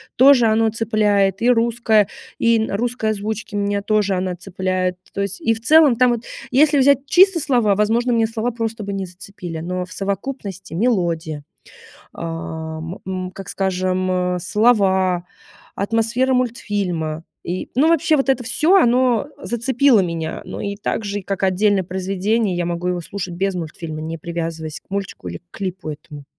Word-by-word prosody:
тоже 260 -2 +6
оно 220 0 +3
цепляет. 210 -3 +1
И 240 - +3
русское, 230 -3 +3 0.3
и 230 -1 +3
на 220 -2 -1
русской 235 -1 -1
озвучке 215 0 -4
меня 200 0 0
тоже 210 -1 +1
она 185 -1 -1
цепляет. 185 -1 -2
То 200 - -3
есть 200 0 -3
и 225 -1 +2
в 225 - -10
целом 300 0 +6
там 250 0 +4
вот, 235 -1 -2 0.3
если 290 +3 +4
взять 275 0 +4
чисто 375 -1 +5
слова, 240 -9 +2
возможно, 230 +4 +1
мне 225 -1 +3
слова 225 +2 -2
просто 225 -2 -4
бы 200 0 -4
не 195 -1 -3
зацепили, 180 -2 -8
но 180 +2 -3
в 185 - -18
совокупности 200 -2 -5
мелодия, 170 -8 0 0.7
ам, 160 0 -6
м, 185 -1 -4
как 195 0 -9
скажем, 185 -1 -1 0.6
слова, 190 -3 +2 0.5
атмосфера 230 +5 +1
мультфильма 195 -10 -1 0.2
и 180 +2 -4
Ну, 295 +6 +4
вообще 320 -1 +3
вот 270 - 0
это 265 -2 +2
всё- 305 +10 +3
оно 250 - +3
зацепило 245 0 +3
меня. 165 -2 -3
Ну - - -7
и 200 0 -3
так 210 +1 -2
же 205 0 -2
и, - - -9
как 195 0 -3
отдельное 195 +1 +2
произведение, 190 +2 -1
я 175 - -1
могу 175 +1 -2
его 180 -1 0
слушать 180 0 -6
без 195 +2 0
мультфильма, 160 -1 -6
не 160 +1 -4
привязываясь 165 -2 -5
к - - -44
мультику 195 -1 -5
или - - -5
к - - -24
клипу 185 -4 -5
этому. 145 -1 -10
200 Hz, 165 wpm, -20 LUFS, 180-230 Hz, 0.7 s, тоже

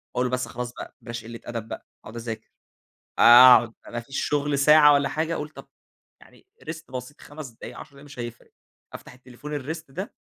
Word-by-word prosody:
أقول 125 0 +1
بس 125 -1 -2
خلاص 120 +1 -6
بقى - - -10
بلاش 115 -1 -7
قلة 115 0 -9
أدب 115 -2 -5
بقى، - - -8 0.2
أقعد 110 - -11
أذاكر. 115 -1 -6 0.7
آآ، - - +3 0.3
أقعد، 115 -1 +2
ما 120 - -4
فيش 135 +3 -4
شغل 145 -1 0
ساعة 150 +1 +7
والَّا 140 -1 +2
حاجة 160 +3 -2
اقول 150 -1 -4
طب، 155 - -14 0.5
يعني - - -21 0.2
rest 165 -4 -9
بسيط 130 +3 -7
5 145 -2 -9
دقايق 115 - -11
10 150 - -10
دقايق 140 +1 -16
مش 145 -3 -14
هيفرق. 120 -1 -8 0.4
أفتح - - -11
التليفون 130 +4 -8
الrest 160 +3 -6
ده 185 +9 -7
135 Hz, 195 wpm, -25 LUFS, 120-150 Hz, 0.7 s, ساعة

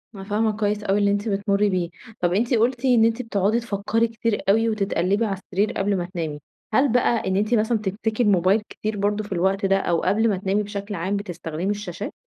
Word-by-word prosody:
أنا 195 - -8
فاهمة 215 +1 0
كويس 210 0 -1
أوي 195 0 +1
اللي 200 0 +3
أنتِ 205 +2 -1
بتمُرِّي 200 +1 +1
بيه، 180 -2 -1 0.3
طب 175 0 +1
أنتِ 235 +5 +1
قُلتِ 240 +3 +1
إن 240 -3 +5
أنتِ 230 +2 +1
بتُقعدي 215 0 +1
تفَكّري 225 +1 0
كتير 225 -1 -2
أوي 225 +2 +4
وتِتقلّبي 200 0 0
على 195 -2 -2
السرير 195 +2 -1
قبل 195 0 0
ما 175 - -2
تنامي، 165 -5 -5 0.3
هل 265 +1 +3
بقى 235 -4 +2
إن 190 - 0
أنتِ 210 +4 +1
مثلًا 220 +1 +2
بتمسكي 215 +3 -2
الموبايل 195 +1 +3
كتير 215 -1 -4
برضه 205 +1 0
في 205 - -12
الوقت 190 +2 +1
ده 195 0 +3
أو 170 -3 0
قبل 220 +4 +2
ما 195 - 0
تنامي 195 +2 0
بشكل 205 0 -5
عام 190 +4 -1
بتستخدمي 175 -2 -4
الشاشات؟ 205 -4 -4
205 Hz, 210 wpm, -23 LUFS, 195-220 Hz, 0.3 s, إن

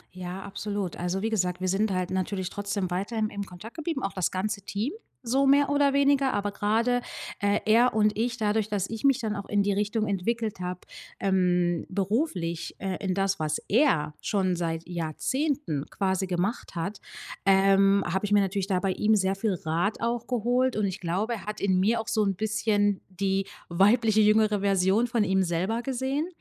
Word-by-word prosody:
Ja, 185 +1 -6
absolut. 200 -2 -4
Also 180 +3 -2
wie 225 - +1
gesagt, 180 -4 0
wir 185 - -2
sind 200 +3 +1
halt 185 -1 -1
natürlich 190 0 -2
trotzdem 200 -2 -3
weiterhin 215 +4 -1
im 200 0 -5
Kontakt 190 +5 -11
geblieben, 315 -3 -3
auch 195 - -2
das 185 -3 0
ganze 200 +2 -2
Team 210 - -3 0.3
so 265 +4 +2
mehr 280 +1 +5
oder 285 -1 +3
weniger, 280 -1 +3
aber 205 0 -1
grade, 230 +5 +1 0.4
äh, 205 +1 +1
er 235 +3 +4
und 210 -1 +3
ich, 235 +2 0
dadurch, 215 -2 0
dass 200 -2 -2
ich 225 +4 -4
mich 275 -2 +4
dann 215 -3 -2
auch 200 - -5
in 205 -1 +2
die 200 - +1
Richtung 210 +2 0
entwickelt 215 +2 -2
habe, 180 0 -4 0.4
ähm, 180 -3 +1
beruflich, 190 - -2
äh, 190 -2 -3
in 190 -2 -1
das, 195 -1 0
was 155 -1 -1
er 205 - +3
schon 185 -3 0
seit 165 -1 -3
Jahrzehnten 170 - -2
quasi 190 -1 -1
gemacht 185 +4 -2
hat, 195 +5 -3 0.5
ähm, 195 0 +5
habe 190 +4 -1
ich 205 - 0
mir 205 - +6
natürlich 195 0 -1
da 185 -3 0
bei 195 - +1
ihm 215 +3 +2
sehr 195 -1 +1
viel 200 0 0
Rat 170 +5 -1
auch 235 0 -1
geholt. 250 +1 +1
Und 215 - 0
ich 190 -1 -3
glaube, 195 +7 -1
er 200 - -9
hat 210 0 -5
in 190 -2 +2
mir 225 +4 +2
auch 225 - -8
so 220 -1 +1
'n 195 -2 0
bisschen 210 -1 +1
die 195 +1 -1 0.2
weibliche, 215 +5 +4
jüngere 215 -1 +4
Version 195 +3 +2
von 230 -2 +1
ihm 190 0 +2
selber 185 +7 -1
gesehen 270 +4 -1
200 Hz, 190 wpm, -27 LUFS, 185-225 Hz, 0.5 s, mir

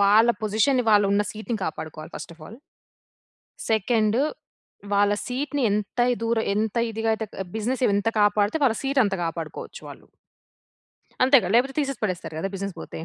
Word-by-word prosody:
వాళ్ళ 215 +4 +6
పొజిషన్‌ని 225 +4 +2
వాళ్ళు 205 -1 +5
ఉన్న 205 - +3
సీట్‌ని 220 +1 -4
కాపాడుకోవాలి 155 0 -6
ఫస్ట్ - - -8
ఆఫ్ 155 - -16
ఆల్. 225 - -12 1.1
సెకండ్ 220 +1 +2 0.7
వాళ్ళ 205 0 +3
సీట్‌ని 275 +2 -2
ఎంత 210 +3 -3
ఇ - - -1
దూరం, 230 -1 +1
ఎంత 220 +2 -1
ఇదిగా 225 0 -2
అయితే 220 0 -4 0.3
బిజినెస్ 250 +4 -2
ఎంత 205 +3 +1
కాపాడితే 205 +4 +3
వాళ్ళ 230 -4 +3
సీట్ 275 0 0
అంత 200 -1 0
కాపాడుకోవచ్చు 165 -1 -6
వాళ్ళు. - - -12 1.2
అంతేగా! 265 -5 +5
లేకపోతే 265 +3 +3
తీసేసి 275 -2 -3
పడేస్తారు 180 -6 -3
గదా 195 +4 -2
బిజినెస్ 195 -1 -4
పోతే. - - -8
215 Hz, 150 wpm, -24 LUFS, 200-245 Hz, 1.2 s, వాళ్ళ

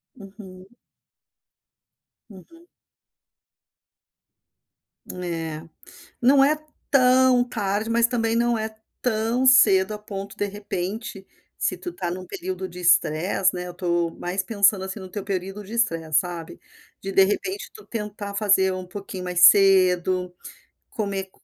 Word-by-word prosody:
Uhum. 190 -3 -13 1.6
Uhum. 330 - -16 2.4
Eh. 165 -3 -5 0.6
Não 270 +3 +5
é 295 +3 +3 0.4
tão 255 -2 +5
tarde, 210 -1 -2
mas 230 0 +3
também 230 -2 -1
não 235 0 +1
é 220 0 -5 0.3
tão 230 +2 0
cedo, 210 -6 +5
a 210 - -5
ponto 200 -1 -8
de 205 - 0
repente, 200 0 -5 0.3
se - - -1
tu 355 - -7
está 180 - -4
num 185 +1 -6
período 185 +1 -5
de 180 0 -11
stress, 180 +2 +2
né, 180 0 -5
eu - - -6
estou 175 -1 -1
mais 185 +2 -3
pensando, 200 -3 +2
assim, 190 +2 -6
no 185 - -9
teu 200 +1 -6
período 195 +1 -4
de 205 - -11
estresse, 165 -10 +1
sabe, 175 -3 -7 0.4
de, 195 - -5
de 195 - +5
repente 375 - -3
tu 430 - -14
tentar 210 -2 -6
fazer 195 -2 +3
um 185 0 -6
pouquinho 190 0 -8
mais 180 -1 +4
cedo, 185 -2 +3 0.6
comer 195 -3 -4
195 Hz, 130 wpm, -23 LUFS, 185-225 Hz, 2.4 s, Não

